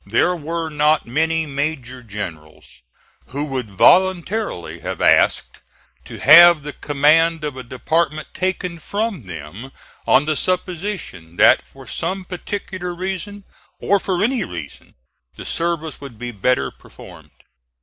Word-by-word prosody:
There 120 - +2
were 165 0 -4
not 150 +1 +2
many 160 +6 0
major 140 -3 -4
generals 80 - -9 0.5
who 140 +3 -3
would 130 -6 -4
voluntarily 185 - +2
have - - -5
asked - - +2 0.5
to - - -9
have 170 -2 +8
the 150 0 -6
command 155 +3 +2
of 145 -3 -3
a 130 - -6
department 155 +5 -2
taken 185 -2 -2
from 200 - -3
them 90 - -9 0.4
on 140 - +4
the 155 0 0
supposition 180 - -3
that - - +5
for - - -15
some 190 0 -4
particular 185 -1 -5
reason, 195 +3 -5 0.4
or 200 0 +2
for 185 -1 -1
any 240 0 +1
reason, 85 - -9 0.4
the - - -9
service 165 -3 -2
would 135 -5 -10
be 120 +2 -5
better 105 - 0
performed. - - -15
155 Hz, 130 wpm, -20 LUFS, 125-180 Hz, 0.5 s, have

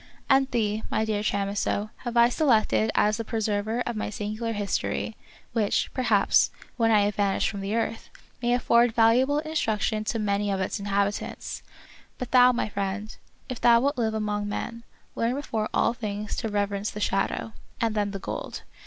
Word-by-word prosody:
And 270 -1 +4
thee, 215 -3 0
my 220 - 0
dear 215 -1 -1
Chamisso, 205 +1 -1
have 240 -1 -4
I 235 0 +7
selected 220 - +2
as 210 +1 +3
the 230 - -3
preserver 220 +1 -1
of 240 -1 -3
my 215 - -2
singular 215 +2 -3
history, 205 +1 -2 0.4
which, 215 -3 0
perhaps, 220 -6 +3 0.3
when 230 -2 +2
I 215 -2 +5
have 205 +1 +1
vanished 200 -1 +1
from 200 -2 -5
the 200 +3 -2
earth, 230 0 -2 0.3
may 240 0 +2
afford 235 -1 +3
valuable 245 +5 +4
instruction 225 -9 -1
to 225 - -1
many 205 -1 0
of 195 -1 0
its 190 +3 -2
inhabitants. 200 0 -2 0.6
But 250 -1 -6
thou, 250 0 +7
my 240 - -1
friend, 200 +1 -4 0.3
if 255 - -6
thou 235 -1 +6
wilt 280 +2 0
live 220 -2 0
among 210 -1 -2
men, 230 +3 -4 0.3
learn 235 +2 0
before 225 -7 -2
all - - +2
things 210 -3 -4
to 225 - -2
rev 205 -1 0
erence 200 +1 -2
the 210 - -7
shadow, 205 +2 -1 0.3
and 225 -2 +1
then 205 -1 0
the 200 - -4
gold. 195 - -6
215 Hz, 180 wpm, -26 LUFS, 205-235 Hz, 0.6 s, I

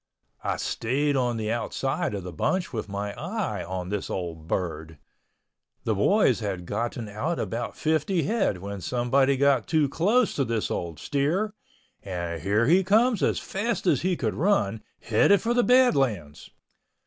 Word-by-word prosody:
I - - -1
stayed 140 +5 0
on 125 -3 0
the 110 0 -2
outside 120 -1 -2
of 100 - -5
the 90 -1 -7
bunch 175 - -1
with 110 -3 -4
my 100 +1 -3
eye 165 - -3
on 90 -1 -5
this 105 -1 -3
old 85 -3 -5
bird. 80 -3 -3 0.9
The - - +1
boys - - +3
had 95 -4 -4
gotten 115 +3 -3
out 125 +12 -2
about 115 +1 -4
50 160 +3 +1
head 205 - 0
when 100 +1 -6
someone 130 +4 +2
got 135 -4 +3
too 155 -3 +2
close 210 - +2
to 140 - 0
this 115 -3 -2
old 85 -3 -3
steer, 160 - 0 0.5
and 85 -3 -4
here 105 +6 +2
he 180 +8 +4
comes 220 +3 +3
as - - +2
fast 225 +4 -2
as 180 - +3
he 180 -1 0
could 110 -4 -1
run, 130 - +1 0.2
headed 155 - +4
for 235 +1 0
the 245 - +4
Badlands! 135 - +2
120 Hz, 160 wpm, -26 LUFS, -, 0.9 s, he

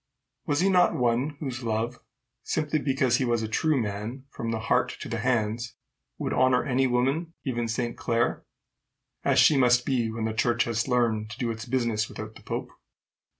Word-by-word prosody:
Was 145 +2 +1
he 195 - +4
not 180 -2 +4
one 125 +4 0
whose 130 -3 -4
love, 115 +1 -2 0.4
simply 155 0 -1
because 130 -3 +2
he 130 - 0
was 120 -2 +1
a - - -2
true 150 +6 +1
man 110 +5 -4
from 115 - -4
the 110 -1 -2
heart 110 - +1
to - - -5
the 115 - -3
hands, 115 0 -1 0.4
would - - -2
honor 130 -1 +3
any 130 0 +2
woman, 135 +7 0
even 120 -3 -1
Saint 120 +1 -2
Clare 120 0 0 0.8
as - - +2
she 155 - +6
must 125 -1 +4
be 120 -4 +1
when 110 0 -3
the 110 - -1
church 120 +1 +2
has 115 0 -1
learned 115 -4 +1
to 110 - -8
do 120 -3 -1
its 110 0 -6
business 115 -4 0
without 110 0 -7
the - - -14
pope? - - -4
120 Hz, 190 wpm, -27 LUFS, 115-130 Hz, 0.8 s, she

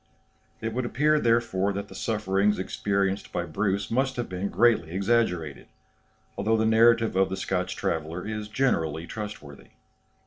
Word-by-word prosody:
It 115 0 -3
would 130 +2 -1
appear, 150 +5 +2
therefore, 115 -6 +1
that 100 +1 -4
the 95 - -12
sufferings 105 0 0
experienced 100 +1 -1
by 90 - -2
Bruce 100 +4 -1
must 130 +2 +1
have 120 - -3
been 95 +2 -3
greatly 115 -8 +3
exaggerated, 95 -7 0 0.7
although 110 +1 +1
the 110 - +1
narrative 115 -1 +4
of 95 0 +3
the 95 - -3
Scotch 95 0 -2
traveller 80 +2 -3
is 105 0 -4
generally 80 - 0
trustworthy. 105 -9 -8
100 Hz, 145 wpm, -26 LUFS, 95-115 Hz, 0.7 s, narrative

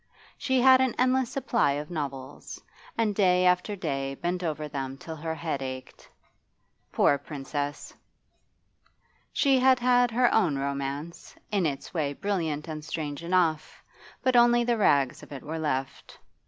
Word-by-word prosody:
She 260 -2 0
had 260 0 +7
an 260 -2 +1
endless 255 -1 +2
supply 235 - +1
of 150 +3 -5
novels, 140 -4 -6 0.4
and 220 -2 +1
day 185 -2 +3
after 180 +3 +2
day 135 -6 -3
bent 175 +4 -3
over 155 -2 -3
them 135 -2 -5
till 160 +3 -8
her 160 +1 -4
head 160 -4 -3
ached. 130 -1 -8 0.8
Poor 140 - +3
Princess! 145 0 -5 1.4
She 270 -2 +3
had 260 0 +5
had 245 0 +3
her 245 +2 +2
own 175 -10 +2
romance, 140 +3 -4 0.2
in 195 -5 +2
its 140 -2 -5
way 150 -5 -1
brilliant 160 -5 -2
and 155 -1 -6
strange 155 -1 -5
enough, 170 -3 0 0.4
but 255 -1 +2
only 240 0 +5
the 240 0 +1
rags 140 -9 +2
of - - -14
it 140 -2 -8
were 160 +2 -5
left. 135 -4 -3
160 Hz, 150 wpm, -27 LUFS, 145-225 Hz, 1.4 s, had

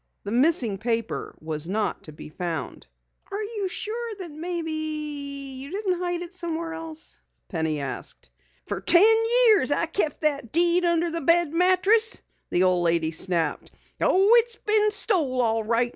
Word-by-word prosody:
The 200 - -6
missing 245 - +1
paper 230 0 -4
was 155 0 -2
not 210 +3 -3
to 155 - -10
be 150 - -12
found. 165 +1 -6 0.4
"Are 410 +2 -4
you 415 -2 -4
sure 460 +5 -5
you 305 -5 -6
didn't 380 -2 -2
hide 350 -1 -3
it 350 +1 -11
somewhere 335 -2 -5
else?" 325 -1 -7 0.3
Penny 160 -4 -3
asked. 130 - -6 0.3
"Fer - - -5
ten 345 +4 +5 0.4
years 415 - +4
I've 325 +3 -1
kept 315 -7 -2
that 285 -6 -1
deed 345 +2 +4
under 340 0 0
the 335 0 +2
bed 335 +1 +3
mattress!" 380 +6 +3 0.3
the 180 - +1
old 180 -1 +1
lady 165 -1 0
snapped. 165 -1 -1 0.3
"Oh, 390 +3 +3
it's 475 0 +2
been 425 0 +3
stole 340 - +1
all 225 -2 0
right. 235 +2 0
315 Hz, 150 wpm, -24 LUFS, 225-360 Hz, 0.4 s, ten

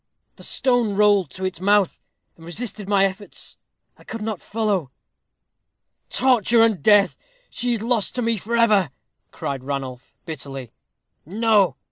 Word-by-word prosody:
"The - - -13
stone 245 -6 +1
rolled 205 -5 +4
to 190 +5 -6
its 185 -2 -4
mouth, 200 -1 +2 0.4
and 165 - -17
resisted 205 +3 -6
my 195 -1 +4
efforts. 195 +1 -6 0.4
I - - -17
could 225 -1 -6
not 215 -4 -4
follow." 205 - -1 1.2
"Torture 235 -3 +4
and 220 -8 +2
death! 205 +3 +5 0.4
She 245 -1 -1
is 220 -2 -3
lost 230 -3 0
to 250 - -1
me 230 -1 +1
for 230 +4 -2
ever!" 210 -8 +4 0.4
cried 135 -2 -4
Ranulph, 130 -2 -5
bitterly. 135 - -7 0.5
"No!" 210 +2 +2
205 Hz, 140 wpm, -22 LUFS, 175-225 Hz, 1.2 s, death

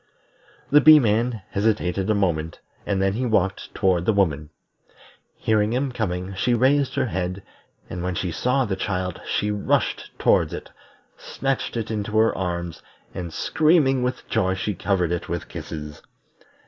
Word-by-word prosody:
The 150 +1 +7
Bee 155 +1 +9
man 115 -3 +1
hesitated 100 -2 0
a 110 - +3
moment, 85 -5 -1 0.3
and 100 -2 0
then 95 0 +1
he 120 +5 -2
walked 95 -4 0
toward 90 -3 +1
the - - +5
woman. 75 -7 0 0.9
Hearing 110 0 +1
him 130 +2 0
coming, 95 -5 -3
she 120 +6 +1
raised 135 +2 +2
her - - +1
head, 95 -3 -3 0.4
and 90 - -6
when 90 0 -2
she 90 0 -2
saw 125 +9 +1
the 100 -4 -2
child 90 -2 -3
she 105 +1 0
rushed 105 -1 0
towards - - +2
it, - - -7 0.5
snatched 135 -3 -3
it 115 -1 -3
into 105 -1 -3
her 110 +1 +3
arms, 85 -3 -4 0.3
and 85 -2 -5
screaming 150 - +2
with 125 0 -3
joy 95 0 +1
she 100 +2 -2
covered 90 -3 0
it 85 - -3
with - - -3
kisses. 75 -1 -7
100 Hz, 160 wpm, -23 LUFS, 90-120 Hz, 0.9 s, Bee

